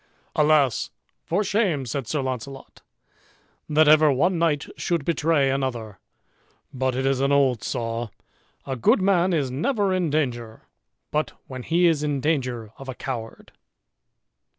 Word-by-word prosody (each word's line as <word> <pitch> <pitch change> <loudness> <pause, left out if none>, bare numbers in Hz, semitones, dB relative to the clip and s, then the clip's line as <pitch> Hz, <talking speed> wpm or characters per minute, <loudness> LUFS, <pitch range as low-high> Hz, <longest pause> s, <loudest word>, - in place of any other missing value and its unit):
"Alas! 150 -4 +3 0.4
for 190 +6 0
shame," 195 - 0
said 125 0 -4
Sir 145 +1 -1
Launcelot, 130 +1 -6 0.9
"that 155 0 +4
ever 155 0 +6
one 170 +6 +1
knight 155 -4 +1
should 170 -5 -2
betray 155 -4 +2
another! 120 -7 -3 0.7
but 130 -1 -1
it 130 +1 -1
is 135 -1 +1
an 140 +1 +2
old 135 -5 +3
saw, 115 0 -3 0.6
a 135 - -3
good 120 - +3
man 185 -1 +2
is 145 -7 0
never 200 - 0
in 180 -3 0
danger, 120 -7 -2 0.5
but 155 +1 -1
when 130 -1 -7
he 170 +7 +2
is 160 -4 +3
in 145 -2 -1
danger 125 -7 -2
of 135 -1 -9
a 130 - -5
coward." 120 -4 -6
140 Hz, 145 wpm, -24 LUFS, 130-160 Hz, 0.9 s, ever